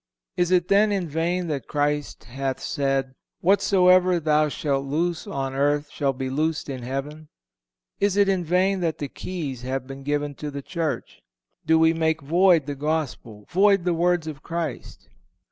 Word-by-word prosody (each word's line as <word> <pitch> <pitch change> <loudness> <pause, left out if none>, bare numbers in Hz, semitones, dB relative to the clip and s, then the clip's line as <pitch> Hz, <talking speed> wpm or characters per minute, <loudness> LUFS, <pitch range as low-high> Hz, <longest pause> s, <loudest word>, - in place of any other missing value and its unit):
Is 175 -1 +1
it 180 -1 +3
then 205 +2 +4
in 190 -4 -1
vain 170 +4 -1
that 140 -5 -3
Christ 145 -1 -1
hath 135 +1 -4
said, 135 -2 -1 0.3
'Whatsoever 185 -1 +4
thou 155 -1 +2
shalt 140 -2 -1
loose 165 +4 -1
on 135 -1 -3
earth 145 +2 0
shall 140 -2 0
be 130 0 -4
loosed 155 +3 -1
in 130 -2 -5
heaven?' 140 +5 -5 0.7
Is 200 -1 +1
it 200 -1 +5
in 190 -2 +1
vain 185 +3 +2
that 165 -3 -1
the 145 - -4
keys 150 -9 -5
have 130 +1 -3
been 135 +1 -9
given 145 +1 -2
to 150 - -3
the 140 -1 -6
Church? 165 -2 -4 0.5
Do 160 0 +5
we 160 0 +4
make 160 -2 0
void 170 +1 +4
the 145 - -3
Gospel, 140 -8 -3
void 195 0 +4
the 175 -1 +1
words 175 0 +1
of 150 -4 -7
Christ?" 170 -1 -5
155 Hz, 170 wpm, -24 LUFS, 140-175 Hz, 0.7 s, it